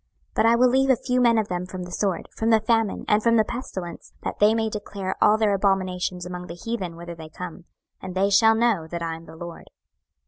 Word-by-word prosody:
26:012:016 - - -42
But - - +2
I 230 - +5
will 250 +1 +5
leave 265 +2 +2
a 260 - +6
few 250 +1 0
men 235 -2 +4
of 215 -2 +1
them 180 -1 -3
from 185 -1 -6
the 180 - -9
sword, 190 -2 -1
from 225 - 0
the 225 -1 +5
famine, 225 -1 0
and 210 +1 +3
from 230 +1 +3
the 220 - +5
pestilence; 190 -8 -7
that - - -4
they 210 +2 +5
may 225 -1 0
declare 205 -3 -4
all 215 - +5
their 215 -2 +2
abominations 185 -2 0
among 180 0 -6
the 170 - -7
heathen 185 -3 -4
whither 170 0 -8
they 160 -1 -10
come; 180 +1 -8 0.4
and 185 -1 -7
they 195 +2 +2
shall 220 +3 +6
know 220 -8 +1
that 170 +1 -5
I 165 -1 -2
am 165 +1 -12
the 160 - -11
LORD. 170 0 -9
195 Hz, 245 wpm, -24 LUFS, 180-225 Hz, 0.4 s, a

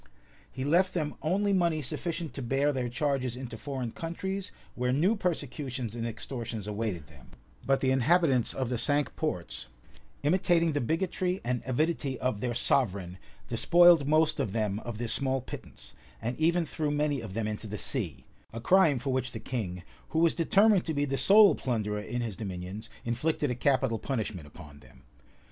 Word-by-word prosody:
[] - - -28
He 130 +1 -4
left 180 +5 +3
them 155 -4 -1
only 200 +5 +1
money 170 -5 +1
sufficient 165 +3 -4
to 140 - -5
bear 135 +4 +1
their 125 -2 -2
charges 130 -1 -1
into 125 -2 -7
foreign 130 -1 -4
countries, 190 - -4 0.2
where 125 0 -1
new 170 - +3
persecutions 140 - -3
and 115 0 -3
extortions 115 -2 -5
awaited 105 -6 -3
them: 75 -4 -17 0.4
but 135 0 +2
the 130 - +2
inhabitants 135 -1 +3
of 130 -3 -2
the 125 -2 -1
cinque 145 +4 +2
ports, 75 - -4 0.6
imitating 170 +1 +3
the 145 - -1
bigotry 180 +6 -1
and 125 0 -1
avidity 140 0 0
of 120 -4 -2
their 120 -2 -2
sovereign, 95 -9 +1 0.3
despoiled 175 -4 +5
most 155 +1 +3
of 100 - -1
them 105 -2 -1
of 115 -1 -6
this 120 0 -1
small 135 -1 +1
pittance, 130 - -10 0.3
and 120 +3 -3
even 170 +2 +2
threw 155 -1 -2
many 145 -2 0
of 105 -4 -8
them 110 -1 -1
into 110 +1 -5
the 105 +1 -5
sea; 85 - -3 0.3
a 115 - -6
crime 165 +2 +4
for 135 +2 -2
which 130 -1 -1
the - - -5
king, 95 -9 -4 0.3
who 160 - -3
was 165 0 +4
determined 200 +3 +4
to 160 - -3
be 145 0 +1
the 135 -1 -2
sole 200 - +7
plunderer 105 -4 -2
in 120 +3 -4
his 110 -4 -4
dominions, 95 +1 -6 0.2
inflicted 135 +4 0
a - - +1
capital 130 -3 +1
punishment 110 - -3
upon 75 0 -13
them. - - -19
130 Hz, 180 wpm, -29 LUFS, 115-160 Hz, 0.6 s, sole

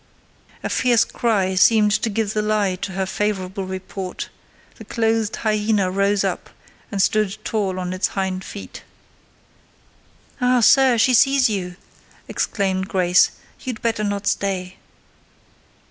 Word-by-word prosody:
A - - -2
fierce 240 -2 +3
cry 200 -5 0
seemed 210 +3 +4
to 225 +2 +1
give 215 0 -1
the 215 - 0
lie 210 -3 +1
to 190 +1 -5
her 190 0 -1
favourable 195 -1 -2
report: 185 0 -6 0.5
the - - -8
clothed 225 -1 0
hyena 210 -3 0
rose 200 +1 +1
up, - - -3 0.4
and 200 - -3
stood 210 0 +1
tall 195 -4 -2
on 180 0 -3
its 185 - 0
hind 190 -1 -2
feet. 200 - -9 1.6
"Ah! 250 0 +3
sir, 260 +1 +5
she 255 +3 +3
sees 270 -1 +4
you!" 180 -3 -3 0.5
exclaimed 190 -2 -1
Grace: 180 -2 +3 0.3
"you'd 250 -5 -6
better 225 -2 0
not 205 -1 -2
stay." 185 -2 -2
205 Hz, 130 wpm, -21 LUFS, 190-220 Hz, 1.6 s, sir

